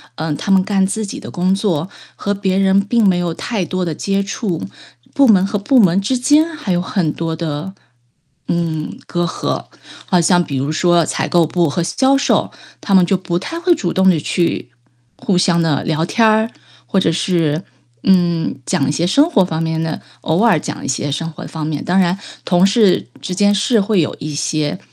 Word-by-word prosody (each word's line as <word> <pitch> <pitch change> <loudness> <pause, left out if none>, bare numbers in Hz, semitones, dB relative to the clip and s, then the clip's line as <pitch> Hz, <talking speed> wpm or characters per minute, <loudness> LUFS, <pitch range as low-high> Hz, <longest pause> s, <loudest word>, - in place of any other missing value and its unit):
呃， 160 -1 -3
他 200 - -3
们 190 -1 +5
干 195 -1 +1
自 215 +2 -2
己 200 - -7
的 - - -9
工 185 +2 +1
作， 185 -6 -1 0.3
和 205 - -2
别 195 -1 -1
人 195 0 +3
并 220 +1 +1
没 185 -2 +3
有 175 -2 -2
太 210 +3 -3
多 185 +1 -2
的 160 - -3
接 195 +4 -1
触， 195 -3 -3 0.5
部 280 - +4
门 195 -6 +5
和 205 +1 -2
部 225 +6 +2
门 190 -2 +4
之 250 +6 0
间 295 +5 +4
还 260 -11 -4
有 175 0 +1
很 180 -4 -1
多 165 +1 -3
的， 160 +2 -4 0.7
嗯， 165 -3 -2
隔 175 0 -1
阂。 - - -3 0.4
好 180 -2 +2
像 175 +1 +3
比 150 -5 -4
如 135 +3 -1
说 175 +1 +2
采 - - -2
购 170 -2 +3
部 170 0 0
和 170 +4 -1
销 265 +9 +2
售， - - +1 0.3
他 200 - -2
们 185 -2 +6
就 190 +1 +1
不 175 -1 -3
太 330 - -5
会 345 0 +3
主 175 - -2
动 190 0 +3
的 175 - +3
去， 165 -4 -1 0.5
互 195 - 0
相 175 -1 +2
地 160 -3 0
聊 160 0 0
天 225 +6 +2
儿 220 +1 +2 0.3
或 195 - 0
者 185 - +2
是， 165 -2 0 0.4
嗯， 175 -6 +2
讲 135 - 0
一 - - +1
些 165 +4 0
生 290 - +3
活 195 - +4
方 160 -2 -3
面 160 0 -1
的 160 -1 -3 0.2
偶 160 +5 0
尔 225 -9 +4
讲 - - -6
一 - - -4
些 135 +2 -2
生 165 +3 -3
活 - - -9
方 160 -2 -5
面， 150 -2 -3
当 180 +2 +1
然 185 0 +2 0.2
同 180 +1 +3
事 200 -1 +3
之 185 - -4
间 205 +2 +3
是 220 +3 +2
会 205 -1 +1
有 155 - 0
一 150 0 -5
些， 150 +2 -2
180 Hz, 225 characters per minute, -17 LUFS, 165-200 Hz, 0.7 s, 们